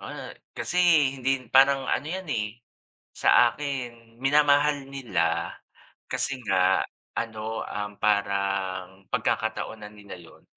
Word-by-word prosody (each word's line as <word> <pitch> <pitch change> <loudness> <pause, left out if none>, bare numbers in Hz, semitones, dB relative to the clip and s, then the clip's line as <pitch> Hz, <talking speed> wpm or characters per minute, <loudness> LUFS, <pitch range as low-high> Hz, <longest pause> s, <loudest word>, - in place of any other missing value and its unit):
oo, - - -8 0.2
kasi 180 - -3 0.4
hindi 135 0 0
parang 135 0 +5
ano 145 - -1
'yan, 185 +3 -4
eh, 105 +1 -3 0.6
sa 120 -1 +5
akin 120 -5 -6
minamahal 145 0 +3
nila 85 -11 -1 0.6
kasi 130 -2 -1
nga 95 -2 +3 0.3
ano, 110 -1 -3
um, 105 0 -5
parang 100 -2 -1
pagkakataon 110 -1 -2
na - - -8
nila 100 -3 -11
'yon. 85 -2 -17
110 Hz, 115 wpm, -26 LUFS, 100-135 Hz, 0.6 s, parang